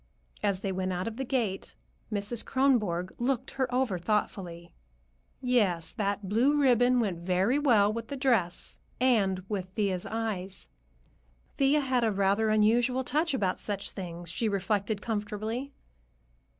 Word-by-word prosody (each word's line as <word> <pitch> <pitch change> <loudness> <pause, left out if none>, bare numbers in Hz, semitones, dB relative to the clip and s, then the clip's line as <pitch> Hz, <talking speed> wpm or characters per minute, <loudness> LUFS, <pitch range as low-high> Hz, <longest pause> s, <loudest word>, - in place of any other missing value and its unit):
As 200 -2 0
they 195 - -2
went 185 0 -2
out 180 +2 -2
of 225 0 -5
the 265 - -2
gate, 235 -7 -2 0.4
Mrs. 210 +2 -1
Kronborg 210 -10 +1
looked 245 0 -1
her 260 -1 -1
over 245 -7 0
thoughtfully. 175 -3 -2 0.7
Yes, 205 -10 +1
that 200 -1 -2
blue 255 +9 +3
ribbon 250 -2 +4
went 195 -7 -1
very 185 +9 +1
well 215 -8 +4
with 230 0 -5
the 280 - -5
dress, 230 -10 0 0.2
and 200 -7 +2
with 195 -3 -3
Thea's 195 -5 -1
eyes. 205 -4 -4 0.9
Thea 280 +2 +4
had 260 -3 +1
a 225 - +2
rather 200 +2 +2
unusual 235 +4 +3
touch 305 +4 0
about 190 -7 0
such 200 -1 -3
things, 175 -2 -6
she 220 +5 -1
reflected 200 +1 -1
comfortably. 220 +4 -3
215 Hz, 140 wpm, -29 LUFS, 190-245 Hz, 0.9 s, ribbon